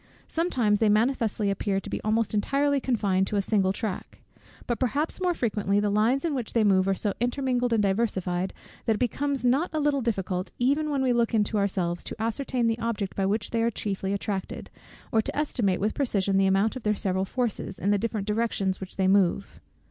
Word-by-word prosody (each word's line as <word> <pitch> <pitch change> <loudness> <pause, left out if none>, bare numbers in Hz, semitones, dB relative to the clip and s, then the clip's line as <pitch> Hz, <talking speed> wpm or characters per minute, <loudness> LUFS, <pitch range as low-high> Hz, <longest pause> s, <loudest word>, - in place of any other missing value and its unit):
Sometimes 245 - +1
they 220 - +3
manifestly 215 -2 +1
appear 195 0 -1
to - - -10
be - - -3
almost 220 +1 0
entirely 280 +6 +1
confined 200 -7 +1
to - - -3
a 200 - +3
single 195 -2 +2
track; 200 -1 -5 0.5
but 240 - -2
perhaps 285 - -1
more 360 -2 +1
frequently 210 -5 0
the 205 0 +1
lines 230 +8 +2
in 325 - 0
which 250 -5 -3
they 230 - +3
move 190 -2 +3
are 195 - +2
so 205 +1 -1
intermingled 245 0 0
and 220 -2 +2
diversified, 190 -3 0 0.3
that 225 - +2
it - - -5
becomes 270 +2 -1
not 270 +8 +2
a 310 - -1
little 290 -2 +1
difficult, 190 -5 -2
even 285 +5 +1
when 280 -2 0
we 255 -2 +3
look 235 -1 +1
into 210 0 +1
ourselves, 185 -3 -1
to - - -6
ascertain 235 +2 -1
the 225 0 +1
object 230 -4 -2
by 195 -1 0
which 205 +2 -1
they 230 - 0
are 230 - +2
chiefly 195 -3 -3
attracted, 200 -1 -4 0.4
or 220 - +3
to - - -5
estimate 235 -11 0
with 210 +2 0
precision 200 -8 0
the 195 0 +4
amount 195 +5 +2
of 255 - -5
their 210 -1 +1
several 190 -1 0
forces, 230 -2 -3
in 200 - 0
the 205 - +2
different 215 -2 -2
directions 210 -3 0
in - - -22
which 190 -1 -8
they 190 -1 +1
move. 190 - +1
215 Hz, 210 wpm, -26 LUFS, 195-245 Hz, 0.5 s, the